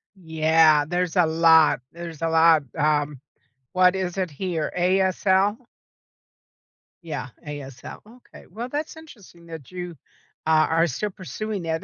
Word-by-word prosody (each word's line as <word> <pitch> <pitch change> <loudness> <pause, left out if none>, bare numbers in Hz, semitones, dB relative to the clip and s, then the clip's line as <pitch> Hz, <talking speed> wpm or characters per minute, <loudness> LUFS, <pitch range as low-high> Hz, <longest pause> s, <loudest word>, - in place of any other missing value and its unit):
Yeah, 160 -3 +3
there's 180 +2 -2
a 180 -2 +4
lot, 160 -4 +4
there's 170 -2 -9
a 165 - 0
lot, 160 -1 +5
um. 150 -2 0 0.5
What 185 0 +4
is 185 -1 -3
it 180 -3 -1
here? 165 0 -3
ASL? 190 +2 +2 1.5
Yeah, 160 -3 -5 0.2
ASL, 140 -4 -9
okay. 240 +3 -17
Well, 230 +7 -6
that's 300 +3 -5
interesting 200 - -15
that 160 -4 -10
you 180 -2 -7 0.5
a 160 - -2
are 160 +2 +3
still 210 +9 -3
pursuing 200 +1 -6
that, 165 +1 -3
170 Hz, 130 wpm, -23 LUFS, 160-190 Hz, 1.5 s, lot